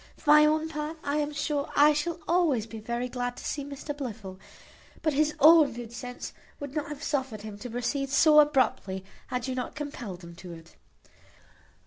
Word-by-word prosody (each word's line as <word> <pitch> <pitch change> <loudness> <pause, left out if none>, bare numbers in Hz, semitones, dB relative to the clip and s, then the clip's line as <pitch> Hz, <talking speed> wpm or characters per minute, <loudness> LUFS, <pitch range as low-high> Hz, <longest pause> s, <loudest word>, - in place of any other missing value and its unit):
For 295 - +1
my 300 0 +8
own 310 +1 +1
part, 305 +1 -5
I 285 +1 -1
am 295 0 -1
sure 290 0 -2
I 295 +1 +6
shall 330 +3 -2
always 320 -10 +2
be 225 -1 -9
very 235 +3 -3
glad 245 0 -4
to - - -9
see 285 - -3
Mr 285 +1 -6
Blifil; 215 -9 -7 0.6
but 310 - +2
his 305 +2 +1
own 305 -2 +7
good 235 -1 -8
sense 245 +1 -7 0.3
would 285 -2 -7
not 300 -1 -2
have 295 0 -7
suffered 260 -9 -2
him 210 -1 -8
to 245 - -7
proceed 265 +4 -2
so 300 +2 +6
abruptly, 255 -10 +2 0.2
had 250 0 -3
you 260 - -2
not 255 -1 -4
compelled 240 -11 -6
him 170 0 -10
to 180 -1 -9
it." 165 0 -14
275 Hz, 190 wpm, -28 LUFS, 235-300 Hz, 0.6 s, my